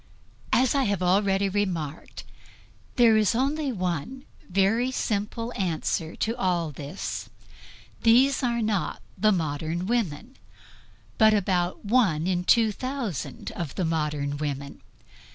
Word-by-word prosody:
As 255 0 +3
I 275 -2 +2
have 200 -3 0
already 195 +2 +2
remarked, 180 -7 -3 0.7
there 235 -3 +6
is 215 0 +2
one 260 - -2 0.2
very 200 +7 +2
simple 230 -1 -2
answer 165 -3 -2
to 225 +2 -1
all 175 -7 0
this; 145 +6 -6 0.7
these 255 +4 +4
are 235 -2 0
not 215 -3 -1 0.2
the 215 0 +3
modern 160 0 -2
women, 230 - -2 0.8
but 220 -1 +6
about 180 -1 0
one 200 -9 +2
in 180 -1 0
two 225 +1 +4
thousand 255 - -4
of 170 -6 -5
the 185 - -1
modern 150 -3 -1
women. 140 -1 -5
195 Hz, 115 wpm, -26 LUFS, 165-230 Hz, 0.8 s, there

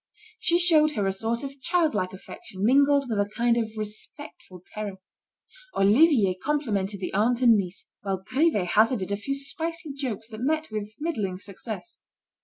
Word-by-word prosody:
She 340 - +3
showed 315 -3 +5
her 205 -6 -1
a 195 - +1
sort 225 +5 -2
of 275 0 -8
childlike 315 - +1
affection 190 +1 -7
mingled 280 +2 +4
with 220 -4 -1
a 205 0 0
kind 235 +2 +1
of 220 -2 -2
respectful 215 - -8
terror. 210 -2 -4 0.8
Olivier 215 - +5
complimented 215 -10 -1
the 185 - -4
aunt 235 +5 +2
and 235 -2 +7
niece, 190 -3 -3 0.2
while 190 -2 -3
Grivet 255 - +1
hazarded 215 -2 +2
a - - +1
few 275 +7 -3
spicy 320 +2 -3
jokes 245 -6 -4
that 220 0 -8
met 310 +2 -1
with 215 0 -5
middling 220 - -2
success. 210 - -7
225 Hz, 160 wpm, -26 LUFS, 200-285 Hz, 0.8 s, and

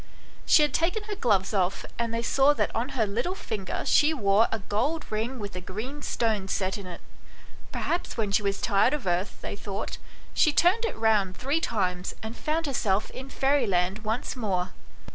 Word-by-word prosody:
She 305 - +7
had 295 -2 +1
taken 355 +8 +1
her 420 0 -5
gloves 205 - +1
off, 190 -1 0
and 235 -1 0
they 230 0 -2
saw 275 +4 +4
that - - -1
on 240 +4 -1
her 225 - +3
little 240 - -2
finger 210 - -4
she 310 +2 +4
wore 205 -2 +4
a 225 - 0
gold 235 +11 -1
ring 225 +5 -2
with 205 -4 -6
a 180 - -4
green 225 +11 -6
stone 220 -7 0
set 190 0 -1
in 195 - -8
it. 175 - -8 0.7
Perhaps 345 -6 -2
when 215 -3 0
she 200 - +3
was 200 -1 -1
tired 220 +6 +3
of 285 - -7
earth, 180 +2 -1
they - - -4
thought, 200 +1 -5 0.3
she 310 - +4
turned 365 +10 +3
it 455 - -3
round 210 -4 +2
three 285 +5 0
times 185 - -1
and 220 +2 -5
found 320 +1 -1
herself 215 -8 0
in 265 +1 -8
fairyland 200 -10 +1
once 220 +6 -2
more. 190 -6 -1
220 Hz, 190 wpm, -27 LUFS, 195-280 Hz, 0.7 s, She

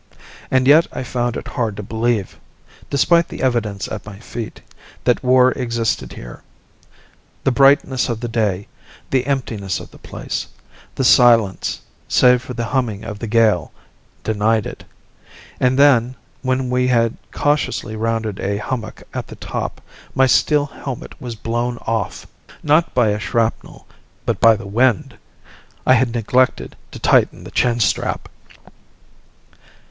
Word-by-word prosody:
And 130 0 +2
yet 155 +4 +6
I - - -5
found 120 -1 -2
it - - -7
hard 110 -4 -2
to 105 - -5
believe 110 -1 -1 0.5
despite 170 +4 +3
the - - -7
evidence 115 -6 0
at 110 -1 -6
my 105 -2 -10
feet 115 +1 -7 0.4
that 125 - +2
war 130 0 +5
existed 115 -4 -2
here. - - -10 1.0
The 135 - +2
brightness 135 0 +3
of 115 -2 -2
the 120 - -4
day, 105 -4 -1 0.4
the 130 -1 +1
emptiness 115 -8 -2
of - - -11
the - - -16
place, - - -5 0.5
the - - -1
silence 115 -6 +4 0.3
save 125 -1 +4
for 125 0 -8
the 120 - -2
humming 120 -5 -1
of 110 -2 -7
the 115 - -4
gale 110 -5 +2 0.5
denied 110 0 +1
it. - - -8 0.7
And 125 0 +2
then, 130 -3 +4 0.3
when 130 -1 -1
we 125 0 +2
had 115 -2 +2 0.2
cautiously 145 -6 -1
rounded 110 -2 -2
a 100 +1 -1
hummock 110 +1 -5
at - - -4
the - - -10
top, - - -5 0.3
my 135 - +5
steel 145 +4 +3
helmet 135 -3 -8
was 120 -2 -5
blown 120 +2 -2
off 110 -5 -2 0.4
not 155 +3 +2
by 120 -4 +4
a 105 0 -1
shrapnel, 115 +1 -2 0.4
but - - -1
by 115 -1 +6
the 105 -1 -8
wind! 115 +2 +1 0.7
I 130 - +6
had 125 -1 +2
neglected 125 +3 +1
to - - -10
tighten - - +2
the - - -10
chin 120 -1 +1
strap. 110 - 0
120 Hz, 145 wpm, -19 LUFS, 110-130 Hz, 1.0 s, yet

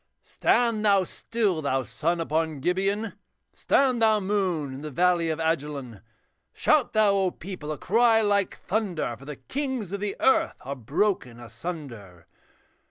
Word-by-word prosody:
'Stand 230 -3 +1
thou 200 -2 +4
still, 200 -2 -1
thou 135 -2 0
sun 150 +10 -1
upon 160 -2 -1
Gibeon, 195 +7 0 0.4
Stand 255 -4 +2
thou, 220 -1 +4
moon, 185 -8 -1
in 135 - -8
the 155 - -5
valley 175 +2 +2
of 160 - -1
Ajalon! 145 - -2 0.5
Shout 295 -5 +2
thou, 200 -3 +3
people, 175 -4 -7
a 150 - -4
cry 225 - +3
like 205 -2 +1
thunder, 185 - -2
For 135 - -15
the 150 0 -6
kings 260 - -4
of 200 - -3
the 205 0 -2
earth 265 - +3
are 140 +2 -5
broken 130 - -1
asunder. 115 - -8
180 Hz, 145 wpm, -26 LUFS, 145-210 Hz, 0.5 s, thou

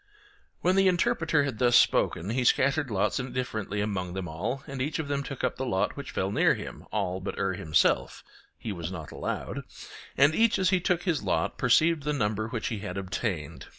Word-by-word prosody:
When 180 +1 +3
the 195 0 +4
Interpreter 160 -4 +2
had 135 -6 -3
thus 120 -1 +4
spoken 95 -3 +3
he 125 +2 0
scattered 140 +3 +2
lots 100 -3 0
indifferently 125 -5 -3
among 95 -4 -3
them 95 -2 -3
all, 85 +12 -3
and 135 -1 -5
each 145 +3 -1
of 160 -3 -3
them 140 -1 -1
took 135 -1 -7
up - - 0
the 130 - -3
lot 95 -5 0
which - - -7
fell 95 +1 -2
near 105 - +3
him, - - -8
all 90 +1 -1
but 95 - -5
Er 95 -1 0
himself 80 -3 +1 0.3
(he 110 - -5
was 85 -2 -5
not 80 -5 -7
allowed), - - -4 0.6
and 145 +3 +5
each 225 +5 +3
as 185 -1 +2
he 185 - +3
took 180 -1 0
his 170 -6 0
lot 85 -4 -1
perceived 155 +6 +4
the 150 +1 -1
number 110 -4 -1
which 115 -1 -3
he 110 - -3
had 100 -2 -5
obtained. 90 - -4
120 Hz, 205 wpm, -28 LUFS, 95-145 Hz, 0.6 s, and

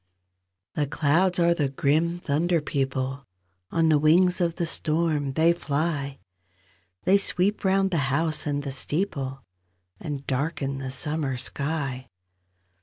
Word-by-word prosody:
C - - 0
he 145 - +1
clouds 170 +6 +2
are 170 -1 +4
the 145 -5 0
grim 160 +4 +1
thunder 170 +2 +1
people; 135 -2 -2 0.5
On 165 -1 +2
the 155 -2 +4
wings 180 +4 +4
of 170 -1 +1
the 170 - -1
storm 155 -3 0
they 165 +4 +4
fly; 145 -3 -2 0.9
They 195 +2 +4
sweep 200 +1 +1
round 195 0 +2
the 170 - +1
house 155 +3 0
and 145 -1 -1
the 140 - -4
steeple, 135 -3 -2 0.6
And 140 -2 -5
darken 140 0 -2
the 135 -1 -4
summer 140 0 -2
sky. 140 0 -3
150 Hz, 135 wpm, -26 LUFS, 140-170 Hz, 0.9 s, are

